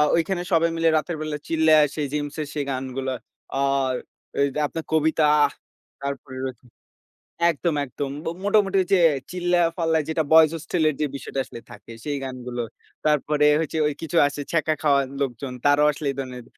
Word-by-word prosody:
ঐখানে 175 Hz, +2 st, 0 dB
সবাই 165 Hz, 0 st, +4 dB
মিলে 165 Hz, 0 st, +3 dB
রাতের 155 Hz, +2 st, -2 dB
বেলা 155 Hz, -1 st, -3 dB
চিল্লাসে 155 Hz, -2 st, +3 dB
জিমস 145 Hz, -1 st, -3 dB, 0.2 s
সেই 145 Hz, -2 st, -2 dB
গানগুলা 130 Hz, 0 st, -3 dB, 0.5 s
আর 135 Hz, -1 st, +1 dB, 0.7 s
আপনার 160 Hz, +2 st, -4 dB
কবিতা 160 Hz, 0 st, +3 dB, 0.8 s
তারপরে 140 Hz, -2 st, -5 dB
রয়েছে। 130 Hz, -1 st, -7 dB, 0.9 s
একদম 165 Hz, +1 st, -1 dB
একদম 135 Hz, +1 st, -5 dB, 0.3 s
মোটামুটি 200 Hz, -2 st, +3 dB
যে 190 Hz, -, +5 dB, 0.3 s
চিল্লায় 175 Hz, -1 st, +2 dB
ফাল্লায় 160 Hz, -3 st, +1 dB
যেটা 160 Hz, 0 st, +1 dB
বয়েস 160 Hz, -1 st, +8 dB
হোস্টেলের 160 Hz, 0 st, 0 dB
এর -, -, -17 dB
যে 150 Hz, -, +2 dB
বিষয়টা 135 Hz, 0 st, -4 dB
আসলে 115 Hz, -, -10 dB
থাকে 115 Hz, 0 st, -12 dB
সেই 145 Hz, -1 st, -2 dB
গানগুলো। 125 Hz, -2 st, -5 dB, 0.4 s
তারপরে 150 Hz, 0 st, +2 dB, 0.6 s
কিছু 165 Hz, +1 st, -3 dB
আছে 145 Hz, +1 st, -4 dB
ছ্যাক 165 Hz, -2 st, +1 dB, 0.2 s
খাওয়া 140 Hz, -2 st, +4 dB, 0.2 s
লোকজন 130 Hz, -1 st, -3 dB
তারাও 145 Hz, +1 st, +5 dB
আসলে 145 Hz, 0 st, -4 dB
এই 135 Hz, -, -6 dB
ধরনের 125 Hz, -2 st, -6 dB
150 Hz, 145 wpm, -24 LUFS, 135-160 Hz, 0.9 s, বয়েস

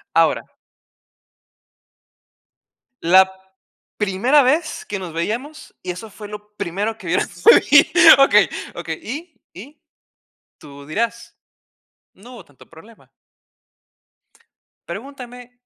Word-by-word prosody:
Ahora. -, -, +2 dB, 2.6 s
La 185 Hz, +3 st, +5 dB, 0.7 s
primera 215 Hz, +8 st, +2 dB
vez 305 Hz, +4 st, -1 dB
que 205 Hz, -, -5 dB
nos 180 Hz, -3 st, -8 dB
veíamos, 230 Hz, -, -5 dB
y 185 Hz, -, -9 dB
eso 190 Hz, +5 st, -7 dB
fue 210 Hz, +1 st, -11 dB
lo 210 Hz, 0 st, -11 dB
primero 205 Hz, +5 st, -4 dB
que 190 Hz, -, -10 dB
vieras 175 Hz, 0 st, -2 dB
por -, -, +8 dB
ahí. 295 Hz, +6 st, +4 dB, 0.3 s
Okey, 275 Hz, -, +5 dB, 0.3 s
okey, -, -, -6 dB
y 310 Hz, +6 st, -8 dB, 0.2 s
y 280 Hz, +9 st, -14 dB, 0.8 s
tú 140 Hz, -1 st, -14 dB
dirás: 230 Hz, +8 st, -4 dB, 0.8 s
"No 235 Hz, +6 st, -16 dB
hubo 245 Hz, -, -12 dB
tanto 145 Hz, -, -21 dB
problema". 210 Hz, +8 st, -18 dB, 1.8 s
Pregúntenme. 250 Hz, -3 st, -10 dB
220 Hz, 105 wpm, -19 LUFS, 185-255 Hz, 2.6 s, por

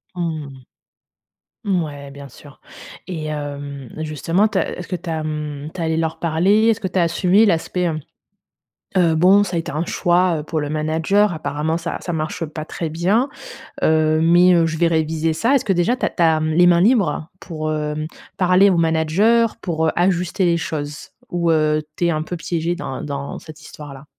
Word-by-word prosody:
Mmh. 160 Hz, -4 st, -3 dB, 1.2 s
Mouais, 150 Hz, -8 st, -2 dB
bien 140 Hz, 0 st, -11 dB
sûr. 140 Hz, +3 st, -16 dB, 0.5 s
Et, 165 Hz, -5 st, -5 dB
hem, 145 Hz, -3 st, -6 dB
justement, 160 Hz, +6 st, 0 dB
tu 215 Hz, -, -1 dB
as -, -, -3 dB
est-ce 180 Hz, -, -7 dB
que 185 Hz, -, -3 dB
tu 175 Hz, 0 st, -7 dB
as, 160 Hz, -1 st, -2 dB
mmh, 150 Hz, -1 st, -5 dB
tu 175 Hz, -, -6 dB
es -, -, 0 dB
allé 160 Hz, 0 st, 0 dB
leur 160 Hz, -1 st, -2 dB
parler? 185 Hz, +7 st, +2 dB
Est-ce 225 Hz, -1 st, +2 dB
que 190 Hz, -, -2 dB
tu 185 Hz, -, -1 dB
as -, -, +4 dB
assumé 180 Hz, +5 st, +3 dB
l'aspect, 180 Hz, 0 st, 0 dB
hem, 160 Hz, -2 st, -1 dB, 1.0 s
heu, 170 Hz, -3 st, +3 dB
bon, 185 Hz, +5 st, +5 dB
ça 180 Hz, -4 st, -3 dB
a -, -, +2 dB
été 165 Hz, -, -4 dB
un 155 Hz, +4 st, -2 dB
choix, 175 Hz, -1 st, +2 dB
heu, -, -, -6 dB
pour 155 Hz, 0 st, -2 dB
le 145 Hz, -, -3 dB
manager, 160 Hz, +7 st, +1 dB
apparemment, 155 Hz, +1 st, -2 dB
ça 170 Hz, 0 st, -4 dB
ça 175 Hz, -, -4 dB
marche 160 Hz, +1 st, -3 dB
pas 155 Hz, 0 st, -7 dB
très 165 Hz, -1 st, -4 dB
bien. 200 Hz, -, +1 dB, 0.5 s
Heu, 155 Hz, 0 st, +3 dB
mais, 175 Hz, +2 st, +5 dB
heu, 170 Hz, -1 st, +4 dB
je 160 Hz, 0 st, -2 dB
vais 170 Hz, +1 st, +3 dB
réviser 160 Hz, 0 st, 0 dB
ça. 235 Hz, -, +2 dB
Est-ce 265 Hz, -, +1 dB
que 195 Hz, -, +2 dB
déjà 180 Hz, +8 st, +1 dB
tu -, -, -1 dB
as -, -, +1 dB
tu 175 Hz, -, -1 dB
as, 160 Hz, -1 st, +4 dB
mmh, 155 Hz, 0 st, -1 dB
les 175 Hz, +2 st, +5 dB
mains 175 Hz, -1 st, +5 dB
libres 195 Hz, -, +2 dB
pour, 155 Hz, -2 st, -4 dB
hem, 150 Hz, 0 st, -3 dB, 0.3 s
parler 185 Hz, +2 st, +5 dB
au 180 Hz, -, +2 dB
manager 170 Hz, +8 st, +2 dB
pour, 160 Hz, -3 st, -1 dB
heu, -, -, +2 dB
ajuster 180 Hz, +1 st, +1 dB
les 170 Hz, -1 st, +2 dB
choses? 150 Hz, -2 st, -5 dB, 0.2 s
Ou, 170 Hz, -1 st, +1 dB
heu, 155 Hz, -1 st, +2 dB
tu 175 Hz, -, 0 dB
es 170 Hz, -, +2 dB
un 155 Hz, -1 st, -1 dB
peu 175 Hz, +2 st, -5 dB
piégé 165 Hz, +1 st, -2 dB
dans 135 Hz, -6 st, -5 dB
dans 140 Hz, -1 st, -5 dB
cette 155 Hz, -1 st, -12 dB
histoire-là? 145 Hz, -3 st, -11 dB
165 Hz, 205 wpm, -20 LUFS, 155-180 Hz, 1.2 s, bon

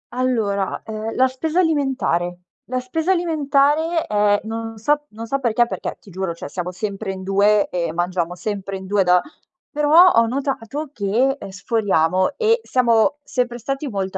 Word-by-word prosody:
Allora, 220 Hz, -6 st, 0 dB
ehm, 220 Hz, 0 st, -5 dB
la 260 Hz, 0 st, +4 dB
spesa 310 Hz, +7 st, -2 dB
alimentare. 265 Hz, -, 0 dB, 0.2 s
La 255 Hz, +1 st, -2 dB
spesa 320 Hz, +8 st, -1 dB
alimentare 315 Hz, -1 st, +1 dB
è 205 Hz, -1 st, +2 dB
non 225 Hz, 0 st, -5 dB
so 295 Hz, +6 st, 0 dB
non 225 Hz, +2 st, -8 dB
so 275 Hz, +4 st, -1 dB
perché, 240 Hz, -1 st, +2 dB
perché -, -, -5 dB
ti 200 Hz, -, -16 dB
giuro, 185 Hz, -1 st, -3 dB
cioè, 170 Hz, -, -8 dB
siamo 180 Hz, +2 st, -4 dB
sempre 195 Hz, +1 st, -4 dB
in 190 Hz, 0 st, -7 dB
2 200 Hz, +2 st, +3 dB
e 170 Hz, -3 st, -2 dB
mangiamo 175 Hz, 0 st, -1 dB
sempre 195 Hz, 0 st, -4 dB
in 190 Hz, -, -9 dB
2 200 Hz, 0 st, +2 dB
da 180 Hz, 0 st, +5 dB, 0.5 s
però 305 Hz, +5 st, +6 dB
ho 230 Hz, 0 st, +5 dB
notato 275 Hz, +3 st, -3 dB
che, 235 Hz, +7 st, +1 dB
ehm, -, -, -8 dB
sforiamo 185 Hz, -, 0 dB
e 460 Hz, 0 st, +3 dB
siamo 245 Hz, +2 st, +2 dB
sempre 245 Hz, -1 st, -2 dB
stati 275 Hz, +5 st, -3 dB
molto 195 Hz, -4 st, -3 dB
225 Hz, 165 wpm, -21 LUFS, 195-275 Hz, 0.5 s, però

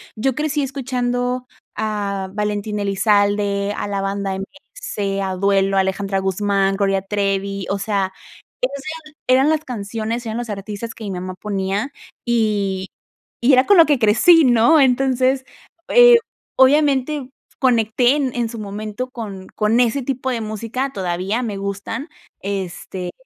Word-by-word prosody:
yo 245 Hz, +4 st, 0 dB
crecí 300 Hz, 0 st, -1 dB
escuchando 250 Hz, -2 st, -2 dB, 0.3 s
a 205 Hz, -3 st, -2 dB
Valentín 210 Hz, 0 st, -2 dB
Elizalde, 205 Hz, 0 st, +1 dB
a -, -, -3 dB
la 200 Hz, -1 st, -2 dB
Banda 195 Hz, 0 st, -2 dB
MS, 200 Hz, -, -5 dB
a 190 Hz, -1 st, -2 dB
Duelo, 195 Hz, 0 st, +2 dB
Alejandra 195 Hz, +1 st, 0 dB
Guzmán, 195 Hz, 0 st, +1 dB
Gloria 195 Hz, -1 st, +1 dB
Trevi, 195 Hz, -1 st, -2 dB
o 200 Hz, -, -1 dB
sea, 195 Hz, -2 st, -1 dB, 0.5 s
esas 280 Hz, -, -2 dB, 0.4 s
eran 265 Hz, +4 st, +4 dB
las 315 Hz, 0 st, 0 dB
canciones, 225 Hz, +1 st, -4 dB
eran 220 Hz, 0 st, -3 dB
los 240 Hz, -2 st, -4 dB
artistas 210 Hz, +3 st, -5 dB
que 220 Hz, -, -9 dB
mi 200 Hz, -, -4 dB
mamá 185 Hz, 0 st, -5 dB
ponía, 200 Hz, +5 st, -2 dB, 0.3 s
y 205 Hz, -5 st, 0 dB, 0.5 s
y 255 Hz, +3 st, +5 dB
era 255 Hz, +1 st, +5 dB
con 405 Hz, -2 st, +5 dB
lo 330 Hz, -, +9 dB
que 290 Hz, -4 st, +2 dB
crecí, 255 Hz, +10 st, +6 dB
¿no? 250 Hz, +5 st, +5 dB
Entonces, 260 Hz, 0 st, +2 dB, 0.4 s
eh, 485 Hz, -1 st, +8 dB, 0.4 s
obviamente 275 Hz, 0 st, +3 dB, 0.3 s
conecté 245 Hz, +1 st, +3 dB
en 265 Hz, -4 st, -1 dB
en 235 Hz, -2 st, -1 dB
su 230 Hz, -1 st, -7 dB
momento 215 Hz, +4 st, -5 dB
con 200 Hz, -6 st, -7 dB
con 215 Hz, +3 st, +2 dB
ese 250 Hz, +3 st, +2 dB
tipo 260 Hz, 0 st, -2 dB
de 235 Hz, -, -2 dB
música, 230 Hz, +5 st, -3 dB
todavía 190 Hz, +4 st, -2 dB
me 210 Hz, -4 st, -3 dB
gustan, 200 Hz, -, -4 dB, 0.3 s
este, 185 Hz, -2 st, -4 dB
215 Hz, 140 wpm, -20 LUFS, 195-255 Hz, 0.5 s, lo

